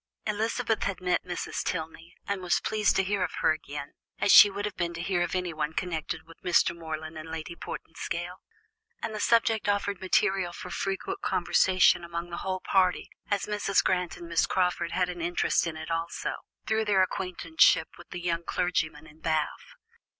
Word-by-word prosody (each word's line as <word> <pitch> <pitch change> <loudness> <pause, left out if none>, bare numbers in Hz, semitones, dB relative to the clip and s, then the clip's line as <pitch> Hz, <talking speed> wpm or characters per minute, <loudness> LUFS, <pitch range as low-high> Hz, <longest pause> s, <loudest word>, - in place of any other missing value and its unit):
Elizabeth 225 +2 0
had 200 -1 -2
met 180 -1 0
Mrs. 180 -1 -4
Tilney, 165 0 -5
and 200 -1 -2
was 175 -1 +2
pleased 215 -1 +1
to 195 - +3
hear 195 0 0
of - - -3
her - - +5
again, 145 -2 -5 0.2
as - - +3
she 205 - +10
would 200 +1 -4
have 210 - -4
been 170 -1 -2
to 165 - -4
hear 180 -1 0
of 175 - -1
anyone 160 -4 -2
connected 165 -3 -3
with 165 0 -16
Mr. 170 -1 +3
Morland 160 -1 -6
and 160 +1 -9
Lady 160 +1 -6
Portinscale; 175 +2 -5 0.7
and 225 - -2
the 215 - -4
subject 225 -1 +2
offered 200 -1 0
material 190 -1 +1
for - - -8
frequent 200 - -3
conversation 185 -2 +3
among 170 0 -5
the 170 - -4
whole 185 -1 -2
party, 185 -2 +2 0.2
as 205 -2 0
Mrs. 205 -2 +1
Grant 180 -2 0
and 170 - -9
Miss 165 -1 +2
Crawford 180 -3 0
had 180 -1 +1
an 175 -1 -6
interest 175 0 +1
in 160 -1 -4
it 160 +1 -6
also, 165 +1 -2 0.3
through 220 0 +1
their 195 -3 +4
acquaintanceship 185 - +2
with - - -14
the 180 - -6
young 170 -1 -1
clergyman 160 -4 -1
in 155 0 -17
Bath. 155 -2 -2
180 Hz, 185 wpm, -28 LUFS, 165-195 Hz, 0.7 s, she